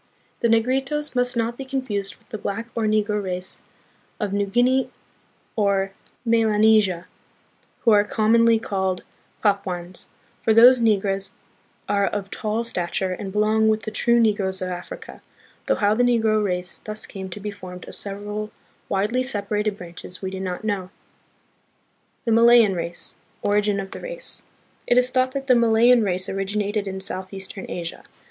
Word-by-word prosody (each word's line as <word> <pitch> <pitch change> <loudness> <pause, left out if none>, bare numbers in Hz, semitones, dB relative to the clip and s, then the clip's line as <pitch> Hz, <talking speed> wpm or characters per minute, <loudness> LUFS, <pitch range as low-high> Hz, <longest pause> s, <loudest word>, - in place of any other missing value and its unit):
The 235 - +2
Negritos 265 +6 +1
must 245 0 +1
not 230 +1 -1
be - - -3
confused 255 -7 -3
with - - -30
the 215 -4 -5
black 225 +4 -4
or 230 -2 -1
negro 210 -1 +1
race 180 -1 -4 0.6
of 205 -3 -2
New 200 0 +1
Guinea 250 +4 +2 0.7
or 200 -2 +1 0.3
Melanesia, 215 -5 +3 0.8
who 230 - +4
are 205 -1 +6
com 215 +1 +1
monly 230 -1 +5
called 190 -4 -2 0.4
Papuans; 185 -4 -1 0.4
for 220 - +3
those 245 +2 +8
Negroes 195 -3 +1 0.5
are 200 -1 +2
of 200 -1 -4
tall 215 +2 -2
stature 185 -3 -2
and 190 +1 -6
belong 215 +2 +2
with 215 0 +1
the 215 - -4
true 235 +2 +3
Negroes 205 -4 +1
of 185 - -3
Africa, 180 -1 -8 0.5
though - - +3
how 205 0 +2
the 230 - +1
Negro 225 -3 +3
race 180 -2 -3
thus 215 0 -7
came 190 -2 -7
to 185 - -7
be 210 +1 -4
formed 185 -2 -10
of - - -9
several 205 +1 -5 0.4
widely 210 +6 +1
separated 210 -4 -1
branches 175 0 -10
we 190 -1 -4
do 190 - -5
not 185 +1 -4
know. 200 -4 -2 1.4
The 230 - +1
Malayan 230 -2 +6
Race. 170 -1 -5 0.3
Origin 205 0 +2
of 195 -1 -6
the - - -7
Race. - - -7 0.5
It 245 - +3
is 250 0 +4
thought 255 0 +1
that 275 -1 -3
the 260 - +5
Malayan 235 +1 +5
race 185 -2 -1
originated 205 +1 -2
in 190 0 -4
southeastern 190 +1 -5
Asia. 170 -1 -5
210 Hz, 160 wpm, -23 LUFS, 195-230 Hz, 1.4 s, those